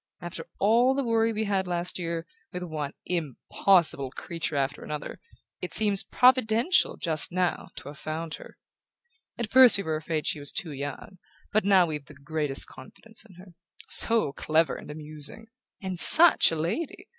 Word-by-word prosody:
After 175 -2 -9
all 235 +6 +2
the 275 - -2
worry 230 -1 0
we 220 0 -3
had 195 -3 -2
last 175 +1 -4
year, 170 -1 -5 0.3
with 180 0 -7
one 155 -4 -6
impossible 165 -1 0
creature 160 +2 -6
after 140 +1 -3
another, 150 -1 -8 0.4
it 180 - -3
seems 205 -3 +3
providential, 250 +5 +1
just 160 -1 -2
now, 180 0 -2
to - - -10
have 145 - -13
found 160 +1 -6
her. - - -15 0.8
At 235 -3 -5
first 255 -5 +6
we 200 - -5
were 160 -2 -3
afraid 155 0 -5
she 150 - -1
was 145 0 -10
too 180 -8 -5
young; 145 +6 -9 0.3
but 215 -1 0
now 190 -3 +4
we've 150 -3 -7
the 150 - -16
greatest 145 0 -4
confidence 220 +12 -12
in 185 - -18
her. 180 0 -16 0.4
So 225 -11 +5
clever 160 +2 -1
and - - -12
amusing 155 +8 -5 0.3
and 185 -2 -5
SUCH 330 - +9
a - - -3
lady! 335 - -5
175 Hz, 170 wpm, -25 LUFS, 155-215 Hz, 0.8 s, SUCH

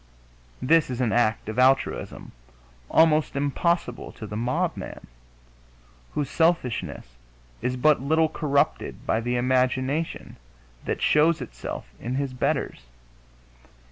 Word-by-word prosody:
This 160 +3 +4
is 125 -1 -4
an 120 -4 +1
act 115 -3 +1
of 110 +3 -3
altruism 130 - +1 0.6
almost 155 -3 +4
impossible 145 -1 -1
to 110 - -8
the 105 - -7
mob 120 +3 0
man, - - -8 1.1
whose 145 -2 0
selfishness 130 - -1 0.4
is 125 +1 -1
but 150 +1 +4
little 160 +3 +3
corrupted 145 -2 -1
by 110 - +1
the 120 +1 -1
imagination 130 +4 0 0.5
that - - -2
shows 155 +2 +4
itself - - -6
in 125 +2 -3
his 135 -1 -2
betters. 60 - -2
130 Hz, 115 wpm, -25 LUFS, 120-155 Hz, 1.1 s, This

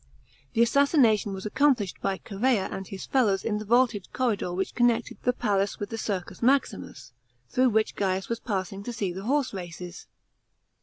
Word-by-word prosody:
The 230 -1 +4
assassination 235 - +3
was 190 +1 -6
accomplished 235 -4 +1
by 195 -1 0
Chserea 215 +1 0
and 190 -1 -5
his 195 - -7
fellows 210 -8 +2
in 210 -2 0
the 215 - -6
vaulted 235 -3 +2
corridor 230 -8 0
which 190 +2 -2
connected 240 -1 +1
the 250 - +2
palace 200 -5 0
with 205 - -5
the 225 - -3
Circus 195 -5 -4
Maximus, 240 - 0 0.4
through 255 0 +4
which 220 -1 +1
Gaius 190 -1 -1
was 230 0 -2
passing 195 -2 -3
to 240 +4 -5
see 200 -5 -2
the 190 +3 -7
horse 275 0 +1
races. 180 -1 -8
210 Hz, 170 wpm, -27 LUFS, 195-245 Hz, 0.4 s, The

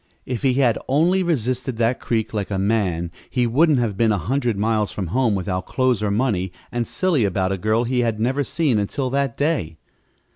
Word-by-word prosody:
If 125 -2 -3
he 130 -2 +2
had 125 -4 +2
only 170 +8 +3
resisted 130 -7 -1
that 115 +2 +1
creek 110 -2 -2
like 105 -3 -2
a 100 - -2
man 95 -5 0 0.2
he 125 -2 +1
wouldn't 145 +5 +3
have 115 -5 0
been 110 +2 +2
a 105 - +1
hundred 120 - -1
miles 110 0 +1
from 95 - -4
home 125 -5 +2
without 95 -1 -3
clothes 130 -5 +1
or 105 - 0
money, 100 -4 0 0.2
and 120 -1 -2
silly 175 -10 +1
about 95 -1 0
a 95 - -1
girl 110 +4 +1
he 125 +1 0
had 115 -3 0
never 130 +5 +1
seen 140 -5 +1
until 125 +6 -2
that 135 -3 -1
day. 140 - -1
115 Hz, 205 wpm, -22 LUFS, 105-130 Hz, 0.2 s, only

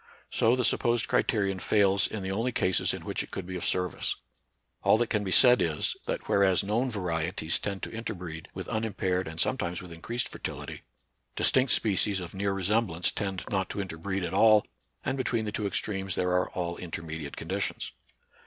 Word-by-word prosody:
So 115 +2 +3
the 125 -2 0
supposed 120 0 +2
criterion 100 -4 +1
fails 100 0 +3
in 105 -3 -5
the 95 - -2
only 115 +6 0
cases 95 -6 +1
in - - -6
which - - -2
it - - -8
could 95 - -5
be 95 0 -6
of 90 - -4
service. 90 -2 0 0.7
All - - +5
that 120 0 -1
can 105 -1 +1
be 95 - -3
said 125 +4 +7
is, 80 -2 0
that - - -3
whereas 95 -2 +4
known 115 +6 0
varieties 85 -5 -1
tend 100 -2 -4
to - - -4
interbreed 90 -8 -6
with - - -7
unimpaired 95 -5 -1
and 80 +1 -6
sometimes 90 -8 0
with 90 -1 -10
increased 115 +9 -2
fertility, - - -6 0.5
distinct 130 0 +5
species 100 -1 +2
of 90 -1 -7
near 100 +1 -1
re 95 -1 -3
semblance 95 -4 +1
tend 95 -3 -3
not 95 -3 0
to - - -4
interbreed 95 +1 -3
at 85 - -3
all; 110 -2 +6 0.4
and 135 - 0
between 115 -3 0
the 105 - -2
two 105 -1 -1
extremes 95 -2 -1
there 90 - 0
are 90 0 +2
all 85 -1 -3
inter 85 -1 -5
mediate 80 -3 -6
conditions. - - -3
95 Hz, 190 wpm, -29 LUFS, 90-110 Hz, 0.7 s, said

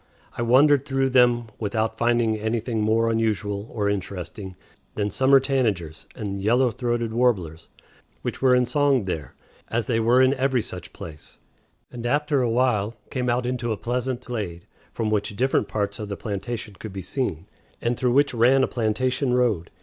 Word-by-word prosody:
I - - -4
wandered 135 +4 +5
through 135 -1 0
them 120 -2 +4
without 110 +1 -1
finding 120 -2 +2
anything 110 +1 -2
more 115 +2 +2
unusual 105 -2 -1
or 105 -2 -1
interesting 95 -1 -4 0.4
than 105 -1 -1
summer 135 +5 +5
tanagers 110 - -1
and 100 -2 -4
yellow 120 +4 +3
throated 120 0 -2
warblers, 95 -10 0 0.5
which - - -4
were 130 -1 +5
in 125 0 +3
song 140 -1 +2
there, 80 -8 -5 0.3
as 115 -1 -1
they 115 -1 0
were 120 +3 +4
in 130 +1 +4
every 130 -3 +1
such 90 -4 -8
place, 75 -3 -10 0.5
and 120 -1 -5
after 145 +1 +1
a 120 - +1
while 115 -3 +1 0.2
came 125 -2 -1
out 120 +1 0
into 125 -2 -2
a 110 - -1
pleasant 125 +2 -3
glade, 100 -8 -5 0.3
from 110 -2 -2
which 105 -1 -1
different 125 -2 +1
parts 100 -1 -2
of 105 -1 -5
the 100 - -4
plantation 105 +1 -5
could 110 -3 -8
be 95 -1 -6
seen, 95 - -3 0.3
and 120 +1 0
through 125 0 +1
which 140 +1 +3
ran 125 +3 +4
a - - +2
plantation 125 +3 0
road. 110 -10 +1
115 Hz, 175 wpm, -24 LUFS, 105-125 Hz, 0.5 s, wandered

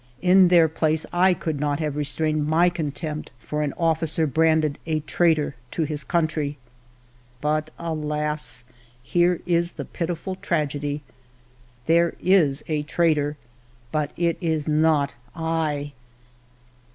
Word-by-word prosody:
In 185 0 +6
their 170 -2 +6
place 155 0 0
I 180 +1 +4
could 155 -3 -3
not 145 0 0
have 150 -3 -2
restrained 150 +1 0
my 165 +3 +4
contempt 155 -2 -4
for 150 +6 -4
an 145 -2 0
officer 165 -1 +1
branded 155 0 +2
a 155 -1 0
traitor 155 -2 +1 0.2
to 165 - -1
his 150 -1 -2
country. 155 -4 -1 0.8
But, 155 +2 0
alas! 150 -5 -3 0.4
here 175 +5 +2
is 170 0 +1
the - - -6
pitiful 175 +2 -4
tragedy. 150 -5 -2 0.8
There 170 +1 +3
is 165 -7 +3
a 155 -2 0
traitor, 150 -2 +1 0.5
but 150 -2 0
it 170 -1 0
is 160 -3 -1
not 155 -2 +2 0.2
I 160 -3 -2
155 Hz, 125 wpm, -24 LUFS, 150-170 Hz, 0.8 s, In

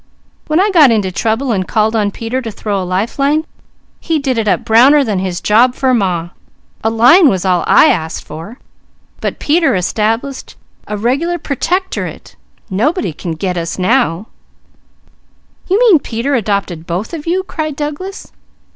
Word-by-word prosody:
_ - - -37 0.4
When 310 +2 +1
I 405 +2 +2
got 315 -7 +6
into 210 -5 +1
trouble 225 +6 -1
and 190 -4 -1
called 220 0 +1
on 210 -2 +1
Peter 230 +5 -4
to 230 - -5
throw 205 -2 -3
a - - -3
lifeline, 275 - 0 0.5
he 325 -1 -1
did 265 -5 -1
it 220 - -2
up - - +1
browner 265 +6 +5
than 210 -7 -1
his 185 -2 -3
job 240 +4 +3
for 260 -1 +1
Ma. 180 -7 0 0.5
A 225 - +2
line 250 +9 +6
was 190 -4 -1
all 180 -2 +2
I - - +6
asked; 160 -1 -2
but 165 - -9
Peter 320 - +2
established 225 +8 -2 0.3
a 210 - -4
regular 280 +11 0
Pertectorate 355 +6 -3 0.3
nobody 215 - -1
can 165 +2 -5
'get' 180 +3 -3
us 165 -1 -3
now 185 -1 +1 0.7
" - - -35
"You 380 - +3
mean 445 -10 +5
Peter 245 +2 -3
adopted 200 - -2
both 185 - -4
of 320 -1 -6
you?" 370 +3 0
cried 310 -5 -4
Douglas. 300 +8 -6
230 Hz, 165 wpm, -15 LUFS, 195-295 Hz, 0.7 s, got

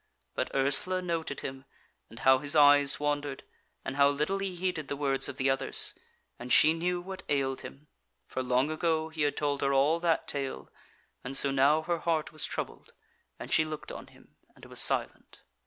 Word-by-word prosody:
But - - -2
Ursula 140 +7 +2
noted 165 -5 -3
him, 135 0 -7 0.5
and - - -14
how 130 0 +4
his 145 +3 -1
eyes 145 -1 +5
wandered, 145 -2 -2 0.4
and 135 - -5
how 140 0 +5
little 150 +7 -1
he 195 -2 -4
heeded 175 -4 -3
the 140 - -3
words 140 -1 -1
of - - -8
the 135 - 0
others, 135 0 +2 0.5
and 125 +1 -8
she 155 - +6
knew 175 +2 -2
what 190 +1 -8
ailed 135 -2 -1
him, 140 +2 -11 0.4
for 130 - -4
long 130 +3 +1
ago 160 0 -1
he 160 -1 -6
had 145 -1 0
told 145 -1 -1
her 140 0 +1
all 145 +5 +3
that 170 -1 0
tale, 140 -2 -4 0.5
and 135 +2 -1
so 140 - +1
now 140 +4 +3
her 170 0 -2
heart 160 -2 -1
was 155 - 0
troubled, - - -6 0.4
and - - -6
she 160 - +4
looked 155 -1 -7
on - - -9
him - - -22 0.2
and - - -15
was - - -2
silent. - - +1
145 Hz, 190 wpm, -29 LUFS, 135-160 Hz, 0.5 s, she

